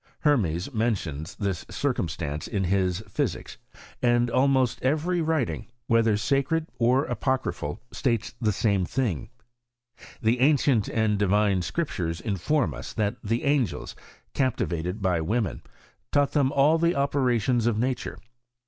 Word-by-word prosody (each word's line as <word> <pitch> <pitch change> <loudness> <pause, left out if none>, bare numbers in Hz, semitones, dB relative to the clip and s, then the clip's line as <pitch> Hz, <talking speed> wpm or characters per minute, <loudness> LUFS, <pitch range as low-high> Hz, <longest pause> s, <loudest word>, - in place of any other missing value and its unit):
Hermes 110 - +1
mentions 95 -9 -2
this 100 -4 -2
circumstance 80 - -2
in 100 -4 -1
his 95 0 +1
Physics; 105 -3 -3 0.4
and 120 0 +3
almost 130 0 +2
every 160 +6 +1
writing 155 -8 -1
(\oyog), 120 0 -37
whether 115 -2 +3
sacred 140 +8 +1
(^ove/ooc) - - -34
or 125 +4 +3
apo 130 +2 +1
crjrphal, 75 - -4
states 115 -2 -1
the 110 -2 +2
same 100 -1 +1
thing. 110 - -2 0.9
The 115 +2 +1
ancient 135 -5 +3
and 110 -2 +1
divine 100 -1 +2
Scriptures 85 - -2
inform 105 - 0
us, 65 - -7
that 105 +2 -1
the 115 +2 -1
angels, 140 - 0 0.4
captivated 95 - -1
by 90 -3 +2
women, 110 +6 -1 0.5
taught 145 -1 +3
them 140 -3 +2
all 150 +4 +4
the 170 +1 +2
operations 125 -4 +1
of 115 -3 +1
nature. 125 +2 -2
115 Hz, 135 wpm, -26 LUFS, 100-135 Hz, 0.9 s, all